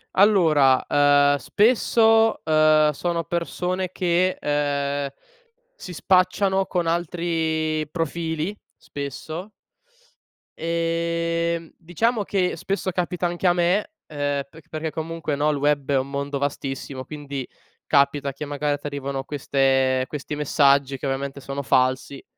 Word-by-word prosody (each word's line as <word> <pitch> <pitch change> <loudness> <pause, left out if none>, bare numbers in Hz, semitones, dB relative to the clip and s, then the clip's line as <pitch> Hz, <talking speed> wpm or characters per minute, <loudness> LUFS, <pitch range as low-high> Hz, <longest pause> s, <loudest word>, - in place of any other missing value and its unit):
Allora, 160 -10 +5
ehm, 145 0 +4
spesso, 225 - +3
ehm, 155 -1 +4
sono 170 +3 -2
persone 180 +1 -2
che, 180 0 +1
ehm, 145 -1 -1 0.7
si 185 - -9
spacciano 190 +2 +2
con 175 -3 -1
altri 160 -2 -1
profili, 165 +3 -3 0.2
spesso. 155 +5 -7 1.1
Ehm, 170 0 -1
diciamo 210 +7 -1
che 190 -2 0
spesso 190 +2 -2
capita 180 0 -2
anche 175 +2 -1
a 175 - +5
me, 180 - +1 0.2
ehm, 145 -2 -2
perc 160 +3 -16
perché 155 0 -4
comunque, 160 -2 -3
no, 145 +2 +1
il 145 - -2
web 145 -1 0
è 140 - +3
un 130 +1 -2
mondo 140 0 -3
vastissimo, 135 -1 -4
quindi 140 -3 -6 0.4
capita 140 -1 +2
che 145 +3 -6
magari 145 0 -1
t'arrivano 140 -2 -4
queste 135 -2 +1
questi 150 0 -5
messaggi 140 -2 +2
che 130 - -7
ovviamente 135 +1 -3
sono 140 +1 -5
falsi. 130 +1 +1
155 Hz, 120 wpm, -23 LUFS, 140-175 Hz, 1.1 s, Allora